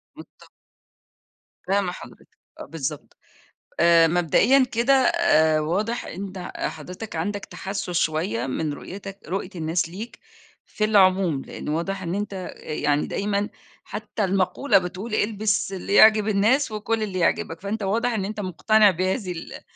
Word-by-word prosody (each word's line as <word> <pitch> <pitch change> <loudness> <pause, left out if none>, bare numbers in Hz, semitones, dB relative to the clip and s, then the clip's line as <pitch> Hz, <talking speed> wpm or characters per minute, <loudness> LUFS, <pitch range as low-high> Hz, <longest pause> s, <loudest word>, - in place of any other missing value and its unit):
متفقة، - - -15 1.2
فاهمة 195 -1 +1
حضرتك، - - -12 0.3
آه - - -7
بالضبط. 150 -2 -6 0.6
آآ 170 -1 +6
مبدأيًا 175 - +4
كده 240 +4 +3
آآ 260 - +4
واضح 200 +10 -1
أنت 185 0 -7
حضرتك 185 +2 -6
عندك 200 +5 -3
تحسَّس 195 -1 -5
شوية 155 -8 0
من 150 +3 -2
رؤيتك 195 +5 -9
رؤية 185 +1 -3
الناس 165 0 -1
ليك 205 +7 -8 0.5
في 215 - -4
العموم، 185 -8 +3
لأن - - -8
واضح 180 +5 -2
إن 170 +1 -3
أنت 205 0 -3 0.2
يعني 150 -1 -1
دايمًا 205 0 -1 0.3
حتى 210 +1 -4
المقولة 195 +5 +2
بتقول 190 +5 -3
البس 210 -2 0
اللي 190 +1 -4
يعجب 215 0 +7
الناس 220 +6 +2
وكُل 215 +1 -1
اللي 190 -3 -3
يعجبك، 165 0 0
فأنت 205 +1 -3
واضح 230 +5 0
إن 195 -3 -1
أنت 215 +1 -5
مقتنع 205 +2 +3
بهذه 185 +3 -2
ال 165 -2 -8
195 Hz, 135 wpm, -24 LUFS, 170-215 Hz, 1.2 s, يعجب